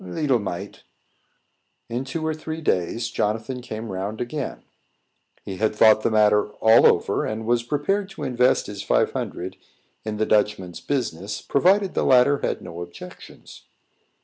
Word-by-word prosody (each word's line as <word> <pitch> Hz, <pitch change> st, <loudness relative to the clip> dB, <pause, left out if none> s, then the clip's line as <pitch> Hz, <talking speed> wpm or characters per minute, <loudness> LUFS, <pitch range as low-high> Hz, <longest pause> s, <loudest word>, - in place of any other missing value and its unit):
"Leetle 125 Hz, -, 0 dB
mite." 95 Hz, 0 st, -6 dB, 1.1 s
In 120 Hz, +3 st, -3 dB
two 155 Hz, +4 st, -4 dB
or 160 Hz, -, 0 dB
three 155 Hz, +1 st, -6 dB
days, 110 Hz, -, -1 dB
Jonathan 115 Hz, +5 st, -2 dB
came 110 Hz, -2 st, -6 dB
round 100 Hz, +3 st, -4 dB
again. 130 Hz, +3 st, -4 dB, 0.8 s
He 95 Hz, -, -6 dB
had 110 Hz, +1 st, 0 dB
thought 110 Hz, 0 st, +6 dB
the -, -, +1 dB
matter 105 Hz, -1 st, +3 dB
all 110 Hz, +1 st, +6 dB
over, -, -, +1 dB
and 110 Hz, +1 st, -4 dB
was 120 Hz, +1 st, +2 dB
prepared 155 Hz, +10 st, -1 dB
to 195 Hz, -, -8 dB
invest 125 Hz, 0 st, +2 dB
his 100 Hz, -1 st, -7 dB
five -, -, +2 dB
hundred 90 Hz, +2 st, -4 dB
dollars 95 Hz, -, -27 dB, 0.4 s
in 110 Hz, -1 st, -4 dB
the 110 Hz, -, +1 dB
Dutchman's 105 Hz, -5 st, 0 dB
business, 105 Hz, -, -3 dB
provided 190 Hz, +6 st, +2 dB
the -, -, 0 dB
latter 130 Hz, +2 st, +4 dB
had -, -, -3 dB
no 85 Hz, -1 st, -8 dB
objections. 85 Hz, +1 st, -12 dB
110 Hz, 155 wpm, -23 LUFS, 105-135 Hz, 1.1 s, thought